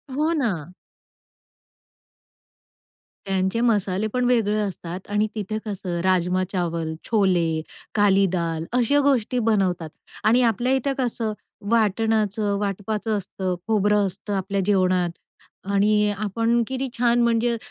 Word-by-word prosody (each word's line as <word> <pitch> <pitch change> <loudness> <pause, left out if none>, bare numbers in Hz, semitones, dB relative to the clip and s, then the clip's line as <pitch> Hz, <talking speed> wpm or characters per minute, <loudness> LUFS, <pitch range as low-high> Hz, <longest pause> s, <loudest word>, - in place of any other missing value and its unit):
हो 310 +3 +1
ना. 185 - -2 2.5
त्यांचे 190 +3 0
मसाले 205 -3 +1
पण 250 -1 +1
वेगळे 220 -4 +2
असतात 185 -3 -5
आणि 210 +1 +2
तिथे 215 +1 -3
कसं 185 -4 -4
राजमा-चावल, 180 -3 0 0.2
छोले, 175 -7 +2 0.3
काली 200 -1 +4
दाल 165 -2 -1
अशा 250 +4 +3
गोष्टी 255 -3 +1
बनवतात. 190 -7 +1 0.3
आणि 235 +4 +4
आपल्या 240 +3 +2
इथे 270 +1 0
कसं 230 -4 -1 0.4
वाटणाचं 215 -2 +1
वाटपाचं 210 +2 -2
असतं, 185 -1 -3
खोबरं 210 -1 +3
असतं 200 +2 -6
आपल्या 195 +1 -1
जेवणात. 185 -3 +2 0.6
आणि 210 +1 +3
आपण 230 +3 +1
किती 265 0 -2
छान! 240 0 +3
म्हणजे 235 0 +2
205 Hz, 110 wpm, -23 LUFS, 185-230 Hz, 2.5 s, काली